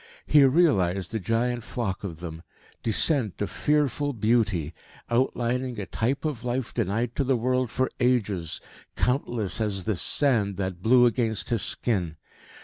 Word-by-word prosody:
He 145 -1 +6
realised 100 - +2
the 110 - -2
giant 115 +4 -1
flock 110 -6 -4
of 85 -5 -6
them 80 -2 -7 0.4
descent 115 - +1
of 105 - -2
fearful 145 -1 0
beauty 105 - +1 0.4
outlining 125 0 0
a 100 - -3
type 130 +10 -2
of 145 -7 -3
life 125 0 -2
denied 115 +2 -1
to 140 - +2
the 130 -1 +1
world 125 +1 0
for 130 +2 0
ages, 105 -10 0 0.4
countless 120 -6 -1
as 100 -3 -1
this 105 -3 -1
sand 110 -9 +3
that 95 -2 -3
blew 125 +4 +5
against 115 -3 0
his 115 -4 0
skin. 90 -10 -1
115 Hz, 145 wpm, -26 LUFS, 100-125 Hz, 0.4 s, He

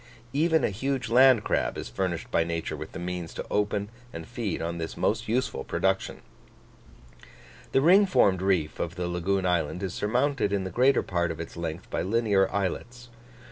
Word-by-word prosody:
Even 160 +3 +2
a - - +1
huge 130 +3 -2
land 125 -2 +6
crab - - 0
is - - -5
furnished 85 +6 -3
by 80 - +3
nature 85 0 -3
with - - -8
the - - -6
means 90 -1 -5
to - - -5
open 105 0 0 0.2
and 85 -4 -8
feed 115 -7 -3
on 85 +1 -3
this 80 - -5
most - - 0
useful 120 - -1
production. 95 0 -1 1.5
The 135 - +3
ring 190 +7 +6
formed 95 - +3
reef 90 -5 0
of 85 +1 -3
the 90 -2 -3
lagoon 90 +2 -1
island 90 +1 0
is 95 -2 -3
surmounted 125 +2 0
in 100 -1 0
the 95 - -5
greater 130 +2 +3
part 85 -2 -1
of 80 -1 -5
its 85 - -7
length 85 -2 -5
by - - -1
linear 100 -2 +2
islets. 120 +5 -3
95 Hz, 180 wpm, -27 LUFS, 85-120 Hz, 1.5 s, land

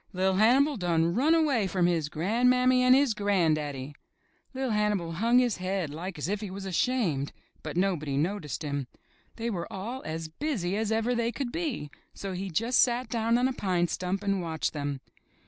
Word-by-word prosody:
''LiT 190 +1 +2
Hannibal 265 +6 +4
done 170 -3 +1
run 295 - +3
away 280 -11 +2
from 185 -2 +1
his 165 -4 +1
gran'mammy 250 +9 +3
and 255 0 +6
his 275 -4 +3
gran'daddy." 155 -9 0 0.6
Li'r 260 -2 -1
Hannibal 210 -5 0
hung 230 +9 +2
his 245 -3 +3
head 185 -4 -2
like 170 +4 -6
as 150 - -3
if 205 +2 -2
he 210 - -5
was 195 +1 -7
ashamed, 185 - 0 0.3
but 155 +1 -6
nobody 165 -7 0
noticed 160 -2 -2
him. 140 -3 -3 0.5
They 230 0 -3
were 175 -5 -4
all 230 +7 -5
as 160 +1 -4
busy 195 - -2
as 220 0 -1
ever 225 +2 +1
they 235 -1 0
could 250 -1 -4
be, 290 - -3 0.2
so 195 -1 -5
he 190 +2 -4
just 230 +9 +1
sat 245 -1 +2
down 230 0 +1
on 250 +1 +3
a 265 - -2
pine 180 -6 0
stump 185 +2 -2
and 195 -2 0
watched 160 -2 -2
them. 145 -2 -3
195 Hz, 185 wpm, -28 LUFS, 165-240 Hz, 0.6 s, and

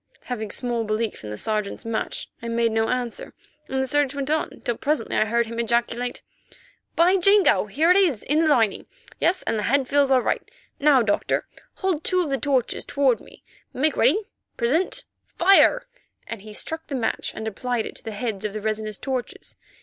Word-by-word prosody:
Having 220 -4 -4
small 240 +1 -2
belief 215 - -2
in 105 - -6
the 105 - -5
Sergeant's 215 - -3
match, 225 -1 -3
I 235 - -6
made 230 0 +1
no 225 0 +1
answer, 250 -2 -3 0.3
and 265 - -2
the 265 - +1
search 285 +1 +1
went 280 +1 -2
on 310 0 +1
till 240 - -1
presently 290 -3 -1
I - - +3
heard 235 +2 +1
him 230 +1 -6
ejaculate: 235 +1 -1 0.7
"By 360 +3 +5
Jingo, 395 - +4
here 310 - +3
it - - +6
is, 335 - +2
in 300 +3 +1
the 325 - +3
lining. 230 -9 +2 0.3
Yes, 360 +2 +1
and 220 - -1
the 210 - -1
head 270 0 +2
feels 280 0 +3
all 260 -2 +4
right. - - 0 0.4
Now, 285 -4 +5
Doctor, 205 -2 0 0.3
hold 365 -5 -1
two 365 -1 +2
of 300 - -4
the 270 - 0
torches 270 -4 0
toward 270 -4 +1
me; - - -16 0.3
make 300 +3 +1
ready, 310 - +3 0.3
present, 325 - +1 0.3
fire!" 390 +7 +5 0.4
and 230 -3 -6
he 215 +1 -11
struck 320 +9 -4
the 280 - -4
match 230 -4 -1
and 220 0 -5
applied 235 +2 -2
it - - -7
to - - -13
the - - -5
heads 215 -1 -4
of 210 -2 -3
the 215 - -4
resinous 215 -1 -3
torches. 260 -3 -5
245 Hz, 195 wpm, -24 LUFS, 225-295 Hz, 0.7 s, it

